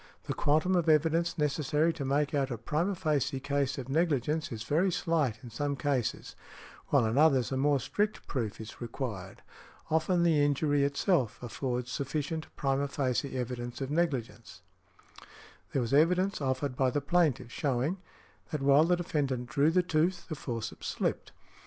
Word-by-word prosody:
The - - -3
quantum 155 +6 +2
of 170 -2 +2
evidence 160 +2 +2
necessary 150 +2 +1
to 155 -3 -5
make 140 +2 0
out 140 -2 +1
a 120 - -3
primâ 165 - -1
facie 145 -4 0
case 140 0 -1
of 130 -2 -5
negligence 150 0 0
is 110 -2 -5
very 165 +10 +2
slight 160 -10 0
in 120 - -9
some 140 +5 -2
cases, 135 -5 -2 0.5
while 135 -5 +3
in 110 +5 +1
others 135 -7 +4
a - - 0
more 140 +1 +3
strict 210 - -2
proof 115 -7 -3
is 110 +2 -9
required. 115 -5 -6 0.5
Often 170 +2 +2
the 160 -4 +4
injury 145 0 +2
itself 140 - +1
affords 125 0 -3
sufficient 150 +4 -3
primâ 140 0 0
facie 135 -1 -1
evidence 120 -1 -4
of 135 0 -4
negligence. 125 - -2 1.1
There 135 - 0
was 115 - -3
evidence 180 +5 +3
offered 130 0 -1
by 130 0 +2
the 145 - 0
plaintiff 140 -5 +1
showing, 140 +7 -1 0.5
that 150 -6 -3
while 140 +3 +6
the 180 +1 +3
defendant 135 -8 -2
drew 145 +1 +3
the 180 +2 +3
tooth, 175 +2 0
the 155 - -3
forceps 115 -5 -5
slipped. - - -2
140 Hz, 160 wpm, -30 LUFS, 130-160 Hz, 1.1 s, while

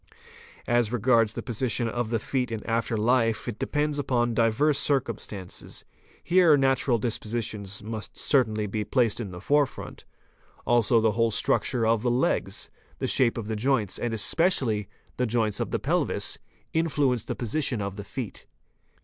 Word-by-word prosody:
As 120 -2 +2
regards 115 -2 +3
the - - -5
position 120 -1 0
of 120 0 -2
the 115 - +1
feet 125 +2 -2
in 110 -2 -5
after 115 0 -1
lfe 115 +1 +1
it 115 -3 -5
depends 150 0 -1
upon 120 -4 0
diverse 125 +6 +2
circumstances. 115 -10 -3 0.4
Here 175 -4 +5
natural 135 -2 +2
dispositions 105 -3 -3
must 110 -1 -6
certainly 110 -7 +1
be 105 +1 -2
placed 115 +1 +1
in 110 -5 -4
the 90 -1 -8
fore 145 +8 +3
front. - - -10 0.6
Also 120 -1 +3
the 110 -1 +3
whole 115 +2 +2
structure 115 +2 +1
of 110 -1 +2
the 120 - +1
legs, 120 +2 0 0.3
the - - -3
shape 120 -3 +3
of 115 - -4
the 110 - -2
joints 110 -3 0
and 120 - -2
especially 115 - +1 0.3
the 125 - +1
joints 110 -2 0
of - - -2
the - - 0
pelvis, - - 0 0.3
influence 145 -7 +1
the - - -3
position 125 0 -1
of 100 -1 -4
the 100 - -6
feet. 110 +2 -7
115 Hz, 160 wpm, -26 LUFS, 110-130 Hz, 0.6 s, Here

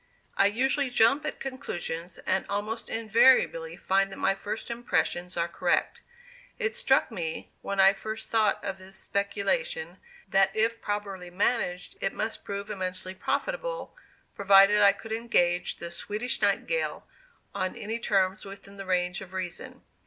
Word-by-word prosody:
I 200 - +5
usually 265 +5 +1
jump 260 +5 +3
at - - -4
conclusions, 175 -10 -4
and 190 - +1
almost 210 +3 -3
invariably 260 - +3
find 195 +1 +1
that - - -8
my - - +2
first 210 +4 -5
impressions 180 -6 -1
are 170 0 +1
correct. 170 - 0 0.6
It 455 -2 -1
struck 265 -1 +2
me, 165 -6 -4
when 200 0 -3
I 195 0 +7
first 220 +1 -6
thought 220 -2 +2
of 195 -1 -3
this 190 +1 -13
speculation, 475 - -2 0.3
that 195 0 +4
if 225 +1 +1
properly 200 -3 -4
managed 180 -1 -1
it 195 - 0
must 220 +1 -3
prove 200 +1 -5
immensely 185 -1 -3
profitable, - - -3 0.4
provided 200 +1 +6
I 200 -1 +8
could 225 - -10
engage 180 -6 +1
the 170 0 -6
"Swedish 215 +7 -3
Nightingale" - - 0 0.5
on 185 0 -2
any 220 +2 -4
terms 195 -2 +1
within 200 0 -11
the 195 -1 -8
range 180 0 0
of 190 -1 -10
reason. 185 -2 -6
200 Hz, 145 wpm, -28 LUFS, 185-230 Hz, 0.6 s, I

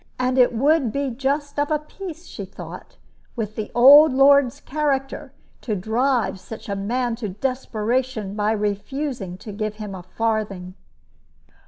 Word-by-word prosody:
And 255 +1 +1
it 250 - +5
would 270 +1 +2
be 280 0 -2
just 285 +3 -2
of 290 - +1
a 305 - +2
piece, 340 +2 -9
she - - -8
thought, - - -10 0.4
with 215 -3 -4
the 215 - -4
old 285 +5 +9
lord's 275 -1 +5
character 275 -2 -2 0.3
to 215 - -2
drive 225 0 0
such 215 +4 -10
a 200 - -2
man 235 +4 -1
to 220 -3 -4
desperation 235 -1 -2
by 210 +1 0
refusing 210 0 -3
to 210 - -9
give 215 +1 -3
him 210 -2 -7
a 185 - -7
farthing. 200 -2 -2
240 Hz, 150 wpm, -22 LUFS, 210-275 Hz, 0.4 s, old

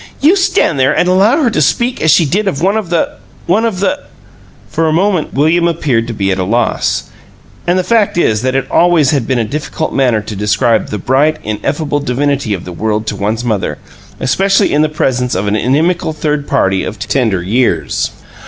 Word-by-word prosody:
"You 315 +7 +4
stand 375 - +1
there 130 +1 +2
and 180 - +2
allow 205 - +3
her 240 - +2
to 155 - 0
speak 240 - 0
as 160 - +2
she 160 +2 +5
did 195 +8 -1
of 175 -8 -1
one 190 +5 +1
of 215 -6 -2
the 170 -2 -1 0.3
one 210 +7 +2
of 200 -5 -2
the 285 +8 0 0.4
" - - -27
For 165 - 0
a - - +1
moment 180 0 0
William 165 +5 +2
appeared 140 -9 0
to 120 - -4
be 100 -2 -1
at 95 - -1
a - - 0
loss, 115 +4 -1 0.6
and 175 +1 +2
the 185 - +1
fact 220 -3 +1
is 110 -11 +2
that 130 +1 -1
it 135 -1 0
always 170 -5 +3
has 145 -3 +1
been 130 +2 -1
a 115 - +1
difficult 150 +5 -4
matter 125 -5 +2
to 105 0 -7
describe 110 +3 +1
THE 105 - -3
bright, 140 +9 +1
ineffable 145 +8 -2
divinity 140 -4 -1
of 90 - -9
the 90 - -7
world 110 +3 -2
to 105 - -3
one's 105 +4 -2
mother, 110 -5 -1 0.4
especially 195 +10 +2
in 150 - +3
the 155 - +2
presence 125 -4 -1
of 95 +3 -1
an 100 +1 0
inimical 155 - 0
third 150 -1 -2
party 95 -8 +1
of 110 - -5
tender 105 -3 -1
years. 95 - 0
140 Hz, 210 wpm, -13 LUFS, 110-170 Hz, 0.6 s, she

